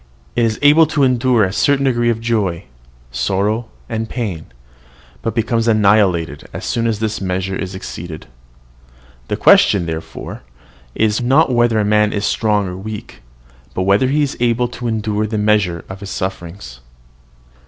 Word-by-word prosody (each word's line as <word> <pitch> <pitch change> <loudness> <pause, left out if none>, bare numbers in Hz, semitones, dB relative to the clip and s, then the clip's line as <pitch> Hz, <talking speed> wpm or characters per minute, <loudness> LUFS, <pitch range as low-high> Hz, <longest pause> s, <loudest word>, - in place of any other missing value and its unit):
It 120 -1 +3
is 110 -1 -1
able 150 +2 +6
to 150 -2 +1
endure 125 -3 +3
a 95 0 -1
certain 140 +5 +2
degree 120 -2 +2
of 115 -1 0
joy, 105 -7 -1 0.5
sorrow, 100 - -1 0.2
and 110 -1 -3
pain, 100 -11 -4 0.7
but 115 - -3
becomes 115 0 0
annihilated 100 -8 +2
as - - -6
soon 115 -1 0
as 110 -2 0
this 110 0 -3
measure 95 0 -2
is 95 -1 -5
exceeded. 85 -3 -7 1.0
The - - -2
question, 95 -4 +5
therefore, 80 -1 -6 0.5
is, 110 +1 +1
not 130 +3 +3
whether 120 -2 +3
a 105 - +2
man 105 0 +2
is 100 0 -1
strong 105 -3 +1
or 90 - -5
weak, 105 +3 -8 0.5
but 95 - 0
whether 100 +7 +3
he 145 +3 +2
is 140 - -2
able 120 0 +1
to 120 0 -6
endure 110 -1 -1
the 110 0 -3
measure 105 -5 +1
of 95 0 -8
his 100 -1 -8
sufferings. 85 -10 -6
110 Hz, 160 wpm, -18 LUFS, 95-120 Hz, 1.0 s, able